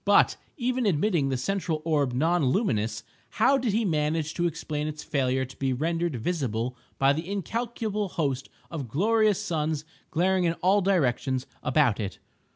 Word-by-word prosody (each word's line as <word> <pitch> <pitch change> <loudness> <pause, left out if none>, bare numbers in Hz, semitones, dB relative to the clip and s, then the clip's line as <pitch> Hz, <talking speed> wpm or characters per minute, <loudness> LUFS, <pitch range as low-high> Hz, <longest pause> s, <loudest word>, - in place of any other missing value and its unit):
But - - +5 0.2
even 250 -2 0
admitting 165 -4 +2
the 130 - 0
central 165 +2 -1
orb 145 -5 +2
non 160 +6 +2
luminous, 110 - 0 0.3
how 275 0 +5
did 240 -4 0
he 220 +2 +1
manage 155 -2 0
to 175 0 +1
explain 150 -2 -3
its 155 0 -5
failure 130 -2 0
to 130 - -13
be 135 -1 0
rendered 165 +3 -1
visible 125 -3 -2 0.2
by 135 +1 +4
the 160 +5 -4
incalculable 210 +1 -2
host 140 -6 -2 0.2
of 150 -6 -4
glorious 210 - +2
suns 155 -2 -1 0.2
glaring 185 +2 +2
in 165 - +2
all 190 +4 +3
directions 135 -8 +1 0.2
about 135 -9 +2
it? 100 -3 -4
160 Hz, 160 wpm, -27 LUFS, 135-190 Hz, 0.3 s, But